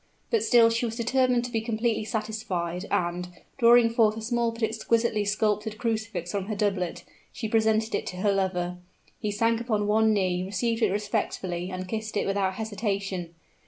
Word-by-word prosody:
But 455 -3 +3
still 230 -2 +5
she 235 +1 0
was 225 - -5
determined 245 +1 +2
to 245 - -6
be 225 -2 0
completely 225 -1 -1
satisfied; 205 -4 -3
and, 175 +1 -1 0.3
drawing 235 -1 +6
forth 220 -2 +3
a - - -5
small 235 +1 +1
but 230 0 -7
exquisitely 225 0 +1
sculptured 210 +1 0
crucifix 220 -7 -2
from 200 -2 -2
her 215 - -2
doublet, 195 -4 -1 0.3
she 225 - -4
presented 220 0 +2
it - - -1
to 180 - -5
her 200 +2 +2
lover. 180 -2 -1 0.4
He 210 - -2
sank 230 +2 +1
upon 215 -3 0
one 220 +1 +3
knee, 185 -3 +1
received 225 +5 -1
it 220 - +4
respectfully, 190 -3 -2
and 185 0 -5
kissed 220 +1 -3
it - - +1
without 195 -1 0
hesitation. 200 -5 -3
215 Hz, 175 wpm, -27 LUFS, 195-230 Hz, 0.4 s, drawing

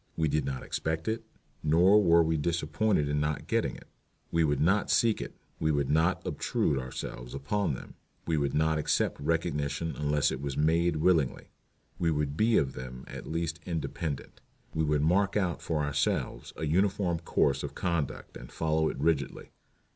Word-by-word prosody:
We 80 - +2
did 75 +1 0
not 65 -1 -3
expect 80 0 -3
it, 110 +1 -1 0.4
nor 90 +7 +5
were 85 -2 +6
we 80 0 +1
disappointed 80 +2 +1
in 75 0 0
not 75 0 -1
getting - - 0
it. - - -14 0.4
We 85 0 +3
would 75 -3 +1
not 95 +7 +2
seek 115 -2 +3
it. - - -7 0.2
We 80 0 +2
would 70 -2 0
not 80 +4 +2
obtrude 70 - 0
ourselves 65 -1 -6
upon 75 +3 -1
them. - - -10 0.3
We 80 - 0
would 70 -3 0
not 80 0 +2
accept 75 - 0
recognition 75 0 -1
unless 75 -1 +1
it - - -4
was 70 -1 -4
made 85 +2 +2
willingly. 75 -4 +1 0.5
We 85 - +2
would 75 -2 -1
be 110 +6 +3
of 65 -4 +1
them 65 0 -8
at - - -8
least 85 0 -2
independent. 80 -3 -4 0.3
We 80 - 0
would 75 -1 +1
mark 95 +6 +2
out 90 -4 0
for 75 -3 -1
ourselves 70 -1 -1
a 80 - -3
uniform 90 +1 +1
course 70 -4 +1
of - - -6
conduct 85 -6 -2
and - - -11
follow 80 0 +1
it - - -5
rigidly. 70 -1 -1
80 Hz, 175 wpm, -29 LUFS, 75-85 Hz, 0.5 s, were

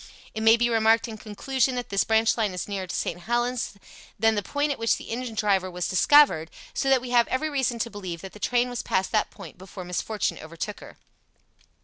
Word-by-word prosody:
It 220 - -4
may 225 +1 +6
be 240 +1 +2
remarked 225 0 +3
in 220 -1 -7
conclusion 255 +5 -1
that 245 -1 -4
this 200 -1 +2
branch 220 0 +3
line 215 -5 0
is 180 - -4
nearer 195 -2 -4
to - - -4
St. 175 - -2
Helens 240 +3 -1 0.4
than 225 +2 +3
the 205 - 0
point 285 +7 -1
at 275 - -4
which 230 0 +2
the - - -9
engine 240 -1 -4
driver 200 -3 +1
was 180 -1 -3
discovered, 185 - +5 0.2
so 270 - 0
that 265 -2 +4
we 250 -1 -7
have 240 -1 +4
every 310 +4 -1
reason 265 -4 0
to 235 0 -2
believe 185 -5 -6
that 190 - -9
the 210 - -12
train 245 +3 +1
was 245 -2 -4
past 190 0 -1
that 215 - +1
point - - -12
before 185 0 -9
misfortune 195 +4 -2
overtook 170 +6 -6
her. - - -13
225 Hz, 225 wpm, -26 LUFS, 195-245 Hz, 0.4 s, may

